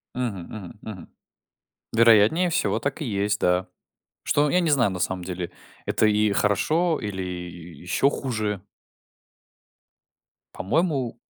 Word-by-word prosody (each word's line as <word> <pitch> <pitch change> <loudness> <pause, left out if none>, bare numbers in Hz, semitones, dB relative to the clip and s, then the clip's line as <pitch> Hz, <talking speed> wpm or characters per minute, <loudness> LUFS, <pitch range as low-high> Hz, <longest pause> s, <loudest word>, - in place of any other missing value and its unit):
Мгм, 120 -8 -2
мгм, 105 -2 -9
мгм. 105 -4 -8 0.9
Вероятнее 115 - +5
всего, 165 - +1
так 140 +4 -3
и 150 - -2
есть, 100 -1 0
да. 90 +1 +1 0.6
Что? 145 0 +2
Я 180 - +4
не 170 -3 +1
знаю 130 -8 +3
на 90 - -5
самом 95 0 -1
деле, 90 -1 -5 0.4
это - - +2
и 105 0 +3
хорошо 155 - +1
или 100 -3 -4
ещё 90 +5 -2
хуже. 110 -8 -3 1.9
По-моему 135 - 0
105 Hz, 120 wpm, -24 LUFS, 95-135 Hz, 1.9 s, Вероятнее